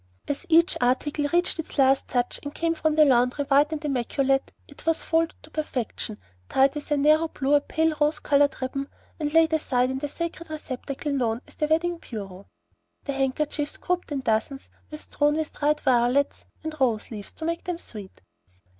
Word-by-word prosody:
As 290 +6 -4
each 335 +1 +5
article 285 +4 +1
received 345 +3 +1
its 325 - -6
last 270 0 +4
touch, 245 -1 -1
and 285 0 -7
came 330 0 +1
from 315 -1 0
the 310 -1 +7
laundry 250 +1 +3
white 285 +2 +4
and 310 -1 -4
immaculate, 270 0 0 0.2
it 285 - -14
was 325 -1 +2
folded 325 0 +1
to 310 - -15
perfection, 255 - -3 0.3
tied 270 +1 +4
with 295 0 -7
a 295 - +2
narrow 305 +3 +4
blue 285 -2 -1
or 290 - +7
pale 320 +2 0
rose 300 +1 +3
colored 285 -1 +2
ribbon, 275 +2 -3 0.3
and 295 -1 -1
laid 325 0 +4
aside 255 -5 +1
in 265 +1 -4
a - - +1
sacred 335 +1 -5
receptacle 290 -1 -5
known 240 -3 0
as - - -15
"The 300 - -1
Wedding 335 +2 +1
Bureau." 200 - -8 0.6
The 280 - -3
handkerchiefs, 290 +2 -1
grouped 360 -2 -2
in 280 -2 -1
dozens, 245 +4 -1 0.2
were 305 - -7
strewn 295 0 0
with 315 -1 -3
dried 300 +1 +1
violets 250 +3 +2 0.2
and 315 0 -4
rose 235 -4 +1
leaves 210 -3 -7
to 320 - -7
make 335 +1 -2
them 355 -1 -2
sweet. 210 - -10
290 Hz, 190 wpm, -25 LUFS, 260-315 Hz, 0.6 s, the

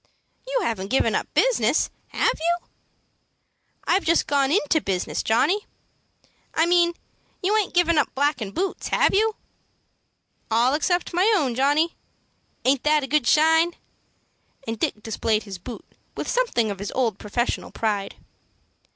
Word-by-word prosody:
"You - - 0
haven't 220 - -2
give 265 +6 +2
up 225 - -1
business, - - +2 0.2
have 480 - +1
you?" 345 +2 -1 1.2
"I've 380 +3 +2
just 335 +1 +2
gone 280 -1 +1
into 315 -3 +2
business, 190 -6 -2
Johnny." 315 - +1 0.9
"I 325 - +3
mean 345 0 +3 0.5
you 405 +4 +2
aint 420 -4 0
give 355 -1 +4
up 315 -4 +1
blackin' 270 -6 0
boots, 370 - -3
have - - +2
you?" 435 +2 +2 1.1
"All 235 +4 +3
except 350 +4 0
my 375 +6 +3
own, 270 -8 0
Johnny. 290 +6 +1 0.7
Aint 265 0 +3
that 300 -1 +2
a - - -3
good 295 -3 +1
shine?" 320 +2 +4 0.9
and 225 -1 -4
Dick 210 - -2
displayed 220 0 -1
his 195 -3 -8
boot 235 +6 -9 0.3
with - - -4
something 350 - 0
of 195 - -7
his 200 - -5
old 230 -6 0
professional 240 +4 -2
pride. 205 -3 -2
295 Hz, 140 wpm, -23 LUFS, 230-345 Hz, 1.2 s, give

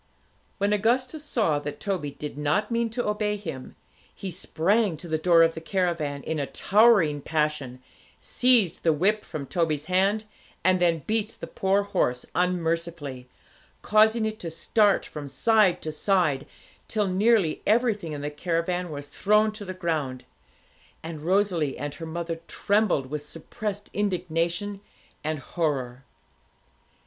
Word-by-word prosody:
When 200 +1 +1
Augustus 255 +8 +1
saw 215 - +1
that 145 0 -6
Toby 185 -8 -2
did 145 +1 -7
not 150 +10 0
mean 235 0 +1
to 240 +1 -3
obey 210 0 0
him, 135 -11 -7 0.4
he 190 - -5
sprang 190 +2 +1
to 170 - -9
the 160 -1 -1
door 170 0 +5
of 165 0 +3
the 160 - -7
caravan 165 -6 -1
in 160 - -2
a 140 - -2
towering 200 - +4
passion, 150 -5 -2 0.4
seized 245 -9 +3
the 165 - +3
whip 205 +7 +1
from 155 -4 -6
Toby's 155 -2 -1
hand, 195 +4 +2 0.4
and 185 -1 +3
then 165 -4 +2
beat 220 0 -1
the - - -5
poor 195 +1 +1
horse 125 -10 0
unmercifully, 165 -7 -1 0.5
causing 220 +1 +4
it 215 0 -3
to 170 - -4
start 205 +5 +2
from 145 -2 -7
side 215 +3 +3
to 155 - -3
side, 155 -4 +1 0.4
till 215 -2 0
nearly 195 -3 +2
everything 215 -6 +2
in 145 -1 -5
the 145 +1 -3
caravan 175 +3 -1
was 145 -2 -7
thrown 210 +7 +2
to 215 0 -8
the 185 - -5
ground, 155 -8 -3 0.8
and 160 -2 -6
Rosalie 175 -4 +1
and 145 0 -4
her 165 - -7
mother 165 0 -4
trembled 200 -10 +1
with 150 -1 -3
suppressed 200 +7 -5
indignation 180 0 -1 0.4
and 155 0 -1
horror. 135 -4 -3
175 Hz, 145 wpm, -26 LUFS, 150-210 Hz, 0.8 s, door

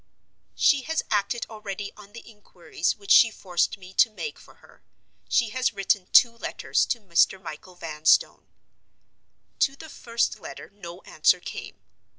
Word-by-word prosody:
She 280 -2 +3
has 320 - 0
acted 210 +3 0
already 205 -2 -7
on 205 -1 -16
the 235 - -12
inquiries 190 -6 -4
which 200 -1 -7
she 225 - +8
forced 180 -5 -1
me 185 -1 -14
to 225 - +4
make 330 - -7
for - - -18
her. - - -22 0.5
She 235 -3 +2
has 255 +2 -1
written 195 -1 0
two 235 -1 +6
letters 230 - -1
to 240 - -1
Mr. 190 -1 +2
Michael 180 +1 -10
Vanstone. 155 -2 +1 1.1
To 275 - +2
the 320 +2 -12
first 235 -4 -2
letter - - -10
no 180 -2 -10
answer - - +2
came. - - -9
205 Hz, 155 wpm, -25 LUFS, 185-230 Hz, 1.1 s, she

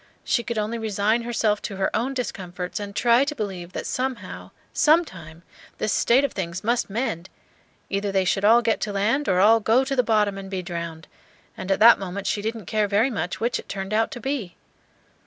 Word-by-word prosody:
She 235 - +1
could 235 -1 -4
only 215 +2 -2
resign 215 +1 0
herself 225 -3 0
to 200 - -5
her 190 +1 -1
own 250 +5 -1
discomforts, 185 -5 -4
and 200 -1 -7
try 240 +3 +4
to 295 +1 -3
believe 185 -6 -5
that - - -5
somehow, 255 -1 -4 0.2
sometime, 185 - +1 0.3
this 215 - -1
state 255 +4 +3
of 280 - 0
things 180 0 -5
must 235 +1 0
mend, 200 -5 -3 0.6
either 200 0 -2
they 190 -1 +1
should 195 +2 0
all 230 +3 +6
get 225 - +1
to 210 - -2
land 225 +9 +1
or 180 -1 +3
all 220 +4 +6
go 230 +5 +3
to 275 +1 -2
the 255 - +4
bottom 210 -4 +1
and 195 0 -8
be 190 -2 -4
drowned, 170 -2 -6 0.5
and 185 - -7
at 195 - +2
that 230 +1 +8
moment 195 +1 -5
she 205 - -1
didn't 220 -1 -4
care 215 +2 0
very 210 +6 +2
much 190 -5 -3
which 235 +2 0
it - - -12
turned 195 +1 -4
out 225 +1 +2
to - - -8
be. 245 -10 -4
210 Hz, 210 wpm, -24 LUFS, 190-235 Hz, 0.6 s, that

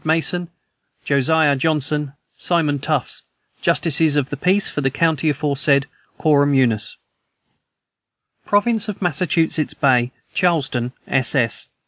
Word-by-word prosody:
MASSON, 165 +2 0 0.6
"JOSIAH 145 +1 +2
JOHNSON, 150 -1 -1 0.3
SIMON 155 -5 0
TUFTS, 140 -1 -2 0.4
Justices 160 -2 +3
of 145 -3 -1
the - - -2
peace 185 +8 +1
for 150 - -3
the 135 - +1
county 160 +1 0
aforesaid, 140 -1 +1 0.3
quorum 145 -2 +2
unus." 115 -5 +1 1.5
"PROVINCE 215 +1 +1
OF 205 - -6
MASSACHUSETTS 165 -2 0
BAY, 125 -4 +2 0.2
CHARLESTOWN, 135 -9 0
SS. 125 -3 +1
150 Hz, 105 wpm, -19 LUFS, 135-165 Hz, 1.5 s, Justices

